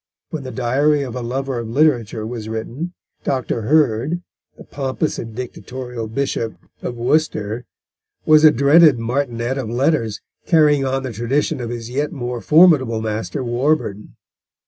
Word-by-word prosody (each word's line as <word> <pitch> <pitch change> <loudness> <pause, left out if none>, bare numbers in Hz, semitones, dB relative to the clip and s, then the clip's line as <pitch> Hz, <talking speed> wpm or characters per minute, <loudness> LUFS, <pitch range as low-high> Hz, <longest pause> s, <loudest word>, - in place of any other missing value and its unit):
When 160 -4 -4
The 130 - -7
Diary 135 +5 +1
of 125 -3 -6
a 125 - -3
Lover 130 +1 -3
of 115 -1 -5
Literature 120 -5 +1
was 110 -1 -6
written, 120 +10 -5 0.3
Dr. 130 -3 -1
Hurd, 150 +5 +1 0.3
the - - -11
pompous 140 +2 -3
and 115 -2 -7
dictatorial 125 -1 -6
Bishop 115 -1 -2 0.3
of 120 - -4
Worcester, 120 -3 0 0.6
was 155 0 +6
a 155 - +10
dreaded 145 +1 +5
martinet 120 +1 -2
of 120 -5 -4
letters, 120 -3 0 0.3
carrying 150 -4 +4
on 135 0 -1
the 130 - -4
tradition 130 +6 -1
of 120 - -4
his 120 0 -6
yet 145 +4 -1
more 125 -6 -4
formidable 150 -9 +5
master 110 +5 -3
Warburton. 120 -4 -1
130 Hz, 145 wpm, -20 LUFS, 115-145 Hz, 0.6 s, a